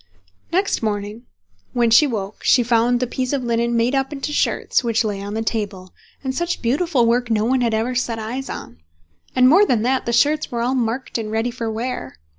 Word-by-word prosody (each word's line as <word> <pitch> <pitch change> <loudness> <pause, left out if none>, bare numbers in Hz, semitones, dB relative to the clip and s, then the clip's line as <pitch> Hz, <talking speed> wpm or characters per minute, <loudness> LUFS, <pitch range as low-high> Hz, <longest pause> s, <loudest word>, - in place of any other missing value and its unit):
Next 385 +3 +1
morning 210 +2 -3 0.5
when 235 -2 +2
she 290 +6 +6
woke 210 -5 -5
she 250 - +4
found 240 +1 +2
the 250 - 0
piece 255 +2 -3
of 275 -3 -1
linen 235 0 0
made 235 +3 +1
up 270 0 0
into 290 +1 -4
shirts, - - +1
which 230 -1 +1
lay 205 -2 -3
on 205 +1 -5
the 225 - -1
table—and 210 +4 -5
such 345 +5 -2
beautiful 270 +1 +2
work 240 +1 +1
no 215 -1 +1
one 255 +2 +2
had 230 -2 +1
ever 230 +3 -1
set 240 -2 -1
eyes 240 +5 -5
on; 80 - -8 0.6
and 255 0 +6
more 350 +10 +6
than 240 - +2
that, 260 +1 0
the - - +1
shirts 295 +6 +2
were 235 -1 -2
all 250 +2 0
marked 245 0 -2
and 215 -1 -4
ready 225 +3 -1
for 235 -2 -4
wear. 220 - -4
235 Hz, 210 wpm, -21 LUFS, 225-260 Hz, 0.6 s, she